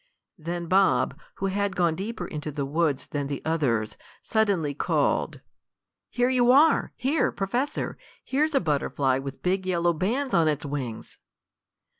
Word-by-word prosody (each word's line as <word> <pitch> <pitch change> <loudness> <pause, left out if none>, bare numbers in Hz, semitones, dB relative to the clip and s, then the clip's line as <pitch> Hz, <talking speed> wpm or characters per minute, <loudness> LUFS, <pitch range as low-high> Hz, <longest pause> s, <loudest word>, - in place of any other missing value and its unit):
Then 170 +2 -4
Bob, 190 +3 +3 0.2
who 195 - -3
had 200 0 -1
gone 170 -2 +2
deeper 195 +2 -5
into 150 -2 -5
the 140 -1 -3
woods 150 -1 0
than 145 -1 -3
the 140 -1 -3
others, 130 -10 0 0.3
suddenly 200 -10 +1
called: 140 - 0 0.7
"Here 245 0 +1
you 245 -1 +3
are! 300 +5 +5
Here, 285 +5 +1
Professor! 240 +9 -2 0.2
Here's 300 +3 0
a - - +5
butterfly 140 -4 0
with 135 0 -7
big 185 +1 0
yellow 175 -1 +2
bands 245 - -1
on 165 -2 +4
its 150 -2 -1
wings!" 135 -6 -5
170 Hz, 145 wpm, -26 LUFS, 145-210 Hz, 0.7 s, are